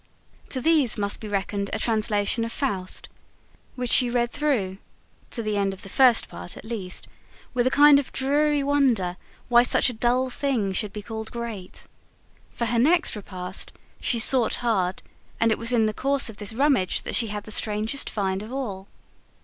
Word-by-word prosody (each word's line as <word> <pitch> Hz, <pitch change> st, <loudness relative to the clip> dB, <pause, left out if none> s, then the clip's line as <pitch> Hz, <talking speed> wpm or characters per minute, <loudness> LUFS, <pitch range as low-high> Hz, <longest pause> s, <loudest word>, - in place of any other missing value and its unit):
To 260 Hz, -, -2 dB
these 295 Hz, -4 st, +2 dB
must 200 Hz, -1 st, -1 dB
be 215 Hz, -, -8 dB
reckoned 200 Hz, 0 st, -2 dB
a -, -, 0 dB
translation 215 Hz, 0 st, +1 dB
of 230 Hz, -, -4 dB
FAUST, 195 Hz, -11 st, -3 dB, 0.7 s
which 250 Hz, -2 st, -2 dB
she 250 Hz, -2 st, +6 dB
read 240 Hz, 0 st, 0 dB
through, 240 Hz, -11 st, -1 dB, 0.5 s
to 230 Hz, -, -3 dB
the 215 Hz, -1 st, -1 dB
end 195 Hz, -1 st, 0 dB
of -, -, -11 dB
the 195 Hz, -, -7 dB
First 250 Hz, +1 st, +4 dB
Part 90 Hz, 0 st, -9 dB
at -, -, -11 dB
least, 205 Hz, -5 st, -4 dB, 0.5 s
with 250 Hz, 0 st, +1 dB
a -, -, +4 dB
kind 290 Hz, +1 st, +6 dB
of 280 Hz, -, -6 dB
dreary 290 Hz, +2 st, +1 dB
wonder 255 Hz, -11 st, +1 dB, 0.3 s
why 240 Hz, -1 st, +6 dB
such 250 Hz, +1 st, +3 dB
a -, -, -9 dB
dull 245 Hz, +3 st, 0 dB
thing 245 Hz, -8 st, -1 dB
should 205 Hz, +2 st, 0 dB
be 210 Hz, 0 st, -8 dB
called 220 Hz, 0 st, -6 dB
great. 230 Hz, -6 st, -7 dB, 0.6 s
For 235 Hz, -, -4 dB
her 235 Hz, +1 st, 0 dB
next 325 Hz, +5 st, +3 dB
repast, 185 Hz, -2 st, -5 dB, 0.3 s
she 240 Hz, -, 0 dB
sought 240 Hz, 0 st, +5 dB
hard 190 Hz, -5 st, 0 dB, 0.4 s
and 230 Hz, -1 st, +3 dB
it -, -, 0 dB
was 230 Hz, +1 st, 0 dB
in 230 Hz, -3 st, +3 dB
the 215 Hz, -, -1 dB
course 275 Hz, 0 st, +1 dB
of 210 Hz, -, -16 dB
this 205 Hz, 0 st, -3 dB
rummage 255 Hz, -6 st, +1 dB
that -, -, -5 dB
she 230 Hz, -, +3 dB
had 210 Hz, -1 st, -5 dB
the 215 Hz, -, -9 dB
strangest 215 Hz, +5 st, 0 dB
find 195 Hz, -2 st, -2 dB
of 215 Hz, +3 st, -9 dB
all. 205 Hz, -8 st, -5 dB
230 Hz, 190 wpm, -24 LUFS, 205-255 Hz, 0.7 s, she